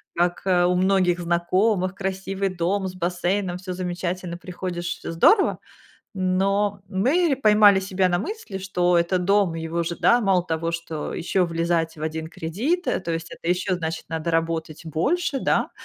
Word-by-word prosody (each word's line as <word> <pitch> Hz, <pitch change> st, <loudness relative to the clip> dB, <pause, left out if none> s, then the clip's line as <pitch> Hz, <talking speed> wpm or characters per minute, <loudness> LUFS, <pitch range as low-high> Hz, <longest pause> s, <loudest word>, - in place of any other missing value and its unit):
Как, 175 Hz, +1 st, +1 dB
э, 180 Hz, -2 st, +3 dB
у 180 Hz, 0 st, +2 dB
многих 185 Hz, -1 st, +2 dB
знакомых: 180 Hz, +3 st, +1 dB
красивый 195 Hz, 0 st, -2 dB
дом 190 Hz, +3 st, 0 dB
с 185 Hz, -, -7 dB
бассейном, 180 Hz, +1 st, -1 dB
всё 185 Hz, 0 st, -6 dB
замечательно, 180 Hz, -1 st, -4 dB
приходишь- 175 Hz, -1 st, -5 dB, 0.2 s
всё -, -, -3 dB
здорово. 385 Hz, -, +4 dB, 0.6 s
Но 195 Hz, +2 st, +1 dB
мы 270 Hz, -, +2 dB
ре 275 Hz, -, +1 dB
поймали 210 Hz, -5 st, +6 dB
себя 190 Hz, -1 st, 0 dB
на 175 Hz, -1 st, +1 dB
мысли, 310 Hz, -, -5 dB
что 180 Hz, -2 st, 0 dB
это 170 Hz, +2 st, +1 dB
дом, 195 Hz, -1 st, +2 dB
его 165 Hz, +1 st, -2 dB
же, 170 Hz, +1 st, -3 dB
да, 240 Hz, +1 st, +5 dB
мало 190 Hz, -4 st, +2 dB
того, 165 Hz, -1 st, -2 dB
что 165 Hz, -2 st, -4 dB
ещё 180 Hz, +1 st, 0 dB
влезать 165 Hz, 0 st, -1 dB
в 155 Hz, -, -9 dB
1 160 Hz, 0 st, -3 dB
кредит, 230 Hz, -, -2 dB
э, -, -, 0 dB
то 170 Hz, -2 st, -3 dB
есть 165 Hz, 0 st, -4 dB
это 165 Hz, -, -6 dB
ещё, 185 Hz, +1 st, 0 dB
значит, 160 Hz, -1 st, -4 dB
надо 165 Hz, +1 st, -2 dB
работать 165 Hz, -1 st, -2 dB
больше, 275 Hz, -, 0 dB
да. -, -, +1 dB
180 Hz, 170 wpm, -23 LUFS, 170-195 Hz, 0.6 s, поймали